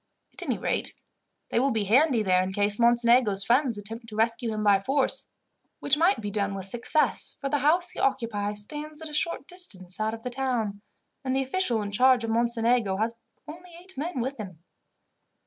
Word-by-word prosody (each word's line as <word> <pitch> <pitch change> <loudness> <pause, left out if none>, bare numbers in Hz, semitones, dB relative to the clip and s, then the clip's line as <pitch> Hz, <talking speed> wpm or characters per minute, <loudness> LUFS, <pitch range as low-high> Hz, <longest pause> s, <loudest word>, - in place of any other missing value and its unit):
At - - -12
any - - -2
rate, - - -2 0.5
they - - +1
will 270 +3 +2
be 220 -5 0
handy 245 +3 +3
there 185 -2 +3
in 185 +1 -3
case 205 +1 +1
Mocenigo's 235 -3 +4
friends 245 +1 +2
attempt 225 +3 -7
to 215 - -8
rescue 230 +2 +1
him 215 -1 -3
by 200 -2 +4
force, 270 +4 0 0.5
which 285 - +2
might 340 +6 +2
be 205 -2 -5
done 200 -1 -1
with 190 -1 -4
success, 240 +9 0
for 275 - -3
the 290 +1 +1
house 345 +6 +2
he - - -8
occupies 210 -5 -1
stands 300 +5 -8
at 315 - -6
a - - -11
short 320 -2 0
distance 190 - -3
out 220 +1 -1
of 225 - -14
the 250 - -4
town, 240 -6 -2 0.4
and 260 -1 -1
the 270 - +1
official 260 - +1
in 205 - -5
charge 250 +2 +4
of 225 - -2
Mocenigo 230 -3 +1
has 225 +3 0 0.3
only 345 +3 -11
eight 375 +2 -13
men 285 -1 -3
with 265 +1 -4
him. 185 -6 -9
235 Hz, 200 wpm, -26 LUFS, 210-275 Hz, 0.5 s, Mocenigo's